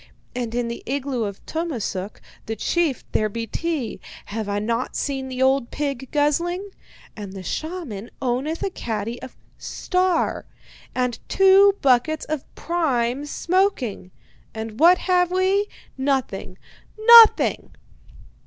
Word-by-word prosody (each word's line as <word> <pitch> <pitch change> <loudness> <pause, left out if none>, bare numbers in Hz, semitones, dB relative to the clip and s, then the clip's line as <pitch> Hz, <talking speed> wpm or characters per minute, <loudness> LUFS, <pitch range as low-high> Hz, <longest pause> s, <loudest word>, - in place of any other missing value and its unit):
And 240 -2 -3
in 240 -1 0
the 235 - -5
igloo 265 -3 -2
of 200 -1 -7
Tummasook, 235 - -4 0.3
the 220 - -2
chief, 315 - 0
there 215 0 +1
be 230 +2 -4
tea 295 -3 -3 0.3
have 215 0 -4
I 205 - -1
not 230 +4 -2
seen 270 -2 -2
the 260 0 -1
old 265 -2 +2
pig 275 -3 -4
guzzling? 345 +7 0 0.4
And 205 -3 -8
the 190 -1 -8
shaman 295 - -5
owneth 265 +6 -2
a 390 - -1
caddy 230 - -4
of 255 - -10 0.2
"Star" 365 -2 -1 0.5
and 250 -2 -1
two 390 +1 +6
buckets 275 +4 +2
of 310 -3 -4
prime 280 -5 -1
smoking. 335 - 0 0.5
And 220 0 -6
what 345 +3 +7
have 360 -1 +2
we? 380 +3 +1 0.3
Nothing! 265 -9 -2 0.4
Nothing!' 455 0 +7
270 Hz, 125 wpm, -23 LUFS, 230-345 Hz, 0.5 s, what